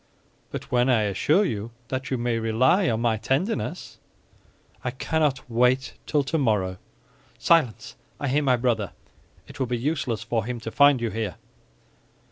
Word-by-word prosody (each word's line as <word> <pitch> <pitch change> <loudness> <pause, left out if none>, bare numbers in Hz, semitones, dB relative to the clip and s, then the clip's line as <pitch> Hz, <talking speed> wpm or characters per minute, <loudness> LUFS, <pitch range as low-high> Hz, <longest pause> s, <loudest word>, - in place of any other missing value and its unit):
"But - - -7
when 125 +1 +3
I 115 -4 +3
assure 145 - +2
you 110 - -3 0.2
that 130 +1 -3
you 130 - 0
may 120 -1 0
rely 130 - +3
on 115 -1 0
my 115 -2 +2
tenderness?" 170 - -2 0.8
"I 125 - -1
cannot 140 +2 -1
wait 125 +3 +2
till 150 -2 +2
tomorrow." 105 - 0 0.6
"Silence! 155 - +2 0.2
I 140 - -2
hear 140 +3 +2
my 130 -3 +3
brother. 115 -5 0 0.5
It - - -12
will 130 - 0
be 120 0 -1
useless 130 -3 -2
for 115 -2 -1
him 120 +1 -4
to 115 - -5
find 145 -1 +5
you 115 -2 -1
here." 105 -4 -3
125 Hz, 155 wpm, -25 LUFS, 115-140 Hz, 0.8 s, find